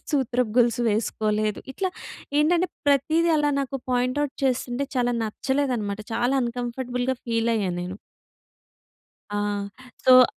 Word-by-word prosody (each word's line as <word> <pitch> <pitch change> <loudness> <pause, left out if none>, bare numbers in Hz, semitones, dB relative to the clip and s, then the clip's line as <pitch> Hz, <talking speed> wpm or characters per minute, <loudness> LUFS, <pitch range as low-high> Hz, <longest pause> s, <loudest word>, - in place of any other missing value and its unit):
సూత్రపు 250 -5 +1
గొల్సు 240 0 +4
వేసుకోలేదు. 215 -1 0
ఇట్లా 380 +5 -1 0.5
ఏంటంటే 340 +4 +3 0.2
ప్రతీది 310 +4 +3
అలా 295 -1 +2
నాకు 275 0 -3
పాయింట్ 250 +2 +1
అవుట్ 280 -3 -2
చేస్తుంటే 260 +1 0
చాలా 245 0 +2
నచ్చలేదనమాట. 230 -3 -1
చాలా 245 +4 +1
అన్‌కంఫర్టబుల్ 245 +1 -3 0.2
ఫీల్ 230 0 +1
అయ్యా 195 -4 0
నేను. 180 +2 -5 1.4
ఆ! 205 -1 -1 0.4
సో 255 -1 +9
245 Hz, 115 wpm, -25 LUFS, 220-270 Hz, 1.4 s, సో